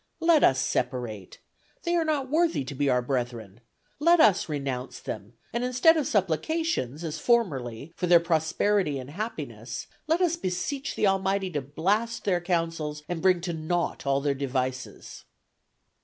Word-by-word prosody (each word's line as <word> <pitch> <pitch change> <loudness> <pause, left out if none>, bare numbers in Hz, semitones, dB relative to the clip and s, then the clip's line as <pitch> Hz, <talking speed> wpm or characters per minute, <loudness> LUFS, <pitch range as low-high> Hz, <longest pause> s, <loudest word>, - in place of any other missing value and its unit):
Let 330 -2 +4
us 130 - +5
separate. 120 -8 -2 0.5
They 345 -1 +1
are 335 - +3
not 300 -4 0
worthy 320 - +2
to 130 - -6
be 140 +1 0
our 125 -1 +2
brethren. 120 -5 -3 0.4
Let 340 +3 +5
us 205 - +4
renounce 135 -4 -4
them, 105 +1 -7 0.2
and 235 +1 -1
instead 255 +6 +4
of 305 -4 0
supplications, 185 - 0
as 160 -1 -4
formerly, 150 - 0
for 180 - -2
their 175 -1 +7
prosperity 165 +1 +1
and 130 +1 -7
happiness, 215 +8 -5 0.2
let 325 +2 +2
us 345 -2 +2
beseech 270 - -3
the - - +1
Almighty 195 -1 +1
to 145 -3 -2
blast 200 - -1
their 180 -3 +1
counsels 165 -4 -2
and 175 -2 -3
bring 185 -2 +3
to 175 0 -3
naught 160 -1 -2
all 140 0 +2
their 140 0 +1
devices." 130 -2 -4
170 Hz, 155 wpm, -27 LUFS, -, 0.5 s, their